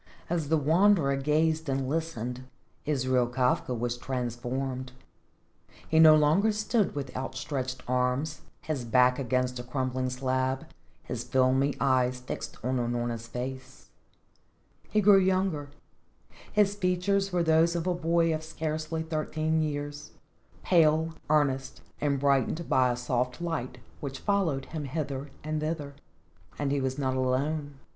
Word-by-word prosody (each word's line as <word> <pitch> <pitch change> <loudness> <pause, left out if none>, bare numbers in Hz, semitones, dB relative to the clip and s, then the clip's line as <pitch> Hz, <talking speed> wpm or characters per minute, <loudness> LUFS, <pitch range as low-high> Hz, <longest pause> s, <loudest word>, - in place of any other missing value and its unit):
As 165 -4 -1
the 160 - +4
Wanderer 160 -1 +4
gazed 155 +2 +1
and 135 -1 -1
listened, 130 -5 -3 0.4
Israel 130 -4 +2
Kafka 125 0 0
was 120 +1 -2
transformed. 130 +1 -3 0.9
He 160 - +3
no 155 -1 +9
longer 155 +9 +4
stood 210 -2 0
with 135 -3 -5
outstretched 130 0 -4
arms, 125 +5 0 0.2
his 150 -5 -3
back 125 +2 +3
against 125 -1 0
a - - -5
crumbling 130 0 -2
slab, 130 +1 -1 0.4
his - - -4
filmy 130 +2 +2
eyes 130 -2 +2
fixed 125 - -6
on 130 +1 0
Unorna's 120 -1 -2
face. 130 +2 -7 1.0
He 215 - +2
grew 200 -1 +7
younger; 185 -6 0 0.8
his 205 -1 +3
features 195 +1 0
were 175 -1 +1
those 165 +1 +3
of 170 -1 -1
a 180 - +1
boy 165 -1 +2
of 155 0 -3
scarcely 160 0 -3
thirteen 160 0 -1
years, 145 -1 -4 0.5
pale, 160 -2 +3 0.2
earnest 135 -3 +1 0.2
and 140 -2 0
brightened 140 +4 +1
by 130 -1 +3
a - - -1
soft 125 0 -1
light 165 -7 -3 0.2
which 135 -2 -5
followed 180 -10 0
him 155 -2 -5
hither 140 -1 -4
and 155 0 -2
thither, 155 -2 -3 0.6
and 145 -2 -1
he 140 -1 +1
was 130 0 -2
not 130 -2 0
alone. 140 +3 -1
140 Hz, 135 wpm, -28 LUFS, 130-160 Hz, 1.0 s, no